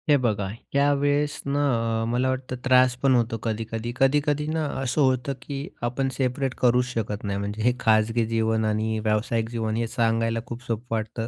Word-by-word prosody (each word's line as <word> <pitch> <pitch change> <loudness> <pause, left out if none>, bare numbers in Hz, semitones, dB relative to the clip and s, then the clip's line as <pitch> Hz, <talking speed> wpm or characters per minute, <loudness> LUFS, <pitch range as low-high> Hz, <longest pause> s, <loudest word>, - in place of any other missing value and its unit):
हे 145 - +7
बघा, 105 -6 0 0.3
त्यावेळेस 145 +1 +2
ना 140 +1 0 0.4
अ, - - -1
मला 125 +2 +1
वाटतं 130 0 -3
त्रास 130 -1 +5
पण 135 -2 +4
होतो 115 -1 +1
कधी-कधी. 115 +1 -3
कधी-कधी 145 +2 +2
ना 155 0 -1 0.2
असं 135 +3 0
होतं 130 0 +2
की 140 +1 -5 0.2
आपण 135 +2 -1
सेपरेट 130 0 -1
करूच 125 0 +4
शकत 110 -4 -4
नाही. 100 -1 -2
म्हणजे 100 +2 -4
हे 125 +1 +4
खाजगी 110 +1 +2
जीवन 110 -1 +1
आणि 110 +1 0
व्यावसायिक 110 +1 0
जीवन 110 -2 -2
हे 115 0 0
सांगायला 115 0 +1
खूप 120 +1 -8
सोपं 115 +1 -4
वाटतं 110 +1 -3
120 Hz, 175 wpm, -25 LUFS, 110-135 Hz, 0.4 s, हे